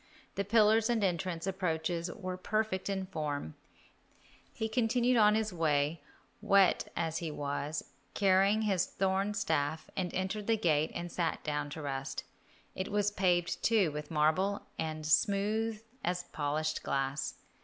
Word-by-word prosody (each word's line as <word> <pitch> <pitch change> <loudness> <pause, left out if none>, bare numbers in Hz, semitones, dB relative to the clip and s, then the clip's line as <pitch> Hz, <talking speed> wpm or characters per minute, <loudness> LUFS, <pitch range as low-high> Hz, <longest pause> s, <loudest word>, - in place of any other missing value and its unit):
The 200 - -1
pillars 220 +2 +4
and 230 -3 +1
entrance 175 -2 -1
approaches 175 -2 -1
were 185 -1 -5
perfect 205 0 -1
in 190 -1 -1
form. 150 - -4 1.0
He 220 - -3
continued 240 +2 +2 0.2
his 215 -2 0
way, 155 -1 +1 0.4
wet 195 -2 +4
as 165 -1 -1
he 165 - -3
was, 145 +1 -3 0.3
carrying 200 +2 +4
his 190 -4 +1
thorn 195 +2 0
staff, 160 -4 -1
and 180 -2 -1
entered 195 +3 -2
the 225 -1 +3
gate 155 -6 +2
and 175 0 -4
sat 170 -1 -1
down 150 -1 -2
to 155 - -6
rest. 135 -1 -3 0.5
It 185 +2 -4
was 205 0 +2
paved, 175 -3 +1
too, 210 -8 +3
with 150 0 -6
marble, 165 +6 +1
and 155 -1 -3
smooth 210 +6 +1 0.2
as 180 0 -1
polished 155 +1 -1
glass. 135 +1 -2
180 Hz, 140 wpm, -32 LUFS, 155-205 Hz, 1.0 s, pillars